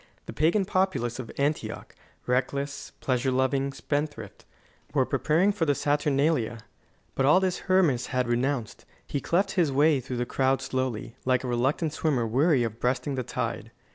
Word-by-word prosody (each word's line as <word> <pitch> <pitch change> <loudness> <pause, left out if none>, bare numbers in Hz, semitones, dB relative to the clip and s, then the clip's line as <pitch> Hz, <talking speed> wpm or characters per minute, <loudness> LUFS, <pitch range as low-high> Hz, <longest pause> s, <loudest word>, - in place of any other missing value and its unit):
The - - -7
pagan 170 +6 +2
populace 165 - 0
of 120 - -6
Antioch 145 +2 -2 0.3
reckless, 140 +3 -2
pleasure 130 0 0
loving, 130 +1 +1
spendthrift 145 -6 -4 0.5
were - - +4
preparing 175 +7 +2
for 200 -5 -1
the 145 -2 +2
Saturnalia. 145 -4 +1 0.6
But 135 - +1
all 150 +6 +6
this 185 -1 -1
Hermas 165 -10 +3
had 125 -1 -1
renounced. 120 -1 -1 0.2
He 140 - -3
cleft 190 +3 +1
his 170 -6 +2
way 145 +1 +4
through 125 0 -5
the 120 - -1
crowd 130 +1 +1
slowly, 130 -3 -3
like 130 0 +1
a - - -3
reluctant 135 +6 0
swimmer 140 -7 0
weary 135 +4 +3
of 115 0 -4
breasting 130 +3 0
the 130 - -1
tide. 120 - -4
135 Hz, 160 wpm, -27 LUFS, 125-155 Hz, 0.6 s, all